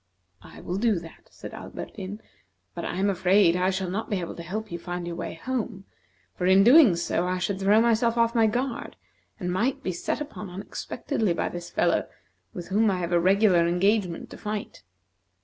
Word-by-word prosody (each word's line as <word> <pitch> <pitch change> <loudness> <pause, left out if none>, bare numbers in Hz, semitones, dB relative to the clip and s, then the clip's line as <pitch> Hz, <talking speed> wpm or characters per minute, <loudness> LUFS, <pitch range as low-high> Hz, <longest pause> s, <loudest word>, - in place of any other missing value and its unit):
"I - - -13
will 180 - -3
do 220 -2 +2
that," 165 -1 -11
said - - -10
Alberdin; 205 +1 -7 0.5
"but - - -6
I - - -3
am 195 +2 +1
afraid 185 -1 +4
I 180 +1 +2
shall 190 0 -2
not 220 +4 -3
be 200 - 0
able 170 - -5
to - - -8
help 210 +5 -5
you 170 - -4
find 175 0 -5
your 170 0 -5
way - - -5
home, 220 -1 -4 0.5
for 180 - -1
in 190 +1 +6
doing 245 - +7
so 170 +1 -1
I 185 0 0
should 190 +2 -2
throw 200 +3 +4
myself 230 0 +2
off 230 0 +3
my 225 -2 +4
guard, 245 +3 -3 0.4
and 180 -3 -2
might 240 +8 0
be 185 - -1
set 170 - -3
upon 290 -9 -7
unexpectedly 200 - -3
by - - -1
this 175 0 -7
fellow, - - +1 0.4
with 175 -1 -8
whom 210 +3 +3
I 190 - 0
have 175 -1 -3
a 175 - +4
regular 185 -1 +4
engagement 180 0 0
to - - -9
fight. 210 0 -5
195 Hz, 200 wpm, -26 LUFS, 180-220 Hz, 0.5 s, doing